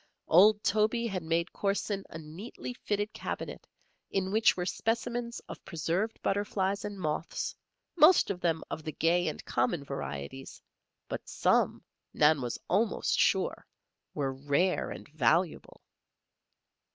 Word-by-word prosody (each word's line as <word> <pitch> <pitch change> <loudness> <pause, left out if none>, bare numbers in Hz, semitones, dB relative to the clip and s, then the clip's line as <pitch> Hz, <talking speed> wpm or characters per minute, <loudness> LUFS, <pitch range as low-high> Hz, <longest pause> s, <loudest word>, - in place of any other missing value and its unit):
Old 205 +5 +6
Toby 220 +2 +2
had 195 -5 -2
made 165 +2 -1
Corson 200 0 -1
a - - -7
neatly 165 +11 -8
fitted 205 -3 -2
cabinet - - -5 0.4
in 190 -1 -1
which 220 -1 +4
were 180 - -1
specimens 235 +4 -2
of - - -10
preserved 170 +6 -2
butterflies 200 0 0
and 205 -1 -5
moths, 155 -1 -2 0.4
most 320 - +6
of 180 -2 -5
them 165 -2 +1
of 155 - -4
the 155 - -5
gay 175 +1 +2
and 155 - -4
common 125 +6 0
varieties; 70 - -6 0.5
but - - -6
some, - - +2 0.3
Nan 150 -1 +5
was 120 -2 -3
almost 205 +4 +1
sure, - - +1 0.5
were 135 -3 -1
rare 145 +7 +1
and - - -8
valuable. 155 +4 0
180 Hz, 130 wpm, -30 LUFS, 155-210 Hz, 0.5 s, Old